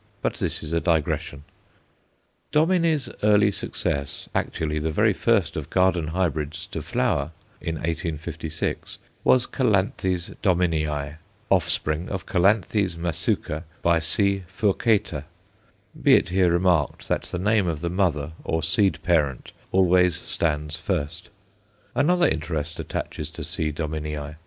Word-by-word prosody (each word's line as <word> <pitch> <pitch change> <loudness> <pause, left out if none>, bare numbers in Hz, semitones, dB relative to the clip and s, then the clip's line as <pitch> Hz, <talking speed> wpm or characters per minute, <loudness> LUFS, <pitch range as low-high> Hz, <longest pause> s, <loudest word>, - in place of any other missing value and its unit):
But - - -1
this - - -2
is 80 +1 -5
a 85 - +3
digression. 80 -4 -1 1.1
Dominy's 160 -2 +2
earliest 105 -1 +4
success, 70 -1 -3
actually 75 -1 -1
the 80 +1 -1
very 105 +7 +3
first 100 -7 +1
of 75 -3 -5
garden 90 -4 +2
hybrids 80 -3 -2
to - - -4
flower 70 +5 0 0.3
in 80 - -3
1856 80 -1 -3 0.3
was 125 -1 +4
Calanthe 95 -6 0
Dominii, 80 -5 0 0.3
offspring 80 +3 +1
of 95 -1 -3
C. 95 - -2 0.6
Masuca 80 -2 -1 0.2
× 85 -1 +3
C. 100 +4 +2
furcata; 95 - +1 0.8
be - - +7
it - - +2
here 90 -1 +3
remarked 85 -4 +1
that - - 0
the - - -4
name 100 +1 +2
of 80 -3 -2
the 85 - -1
mother, 80 -6 0
or 80 -1 -1
seed 95 +4 +3
parent, 75 -7 +1 0.2
always 90 -1 +4
stands 75 -1 -1
first. 85 0 -3 0.6
Another 170 +7 +3
interest 80 0 -2
attaches - - -4
to - - -8
C. 75 -1 -2
Dominii. 75 -1 -4
85 Hz, 125 wpm, -24 LUFS, 75-95 Hz, 1.1 s, be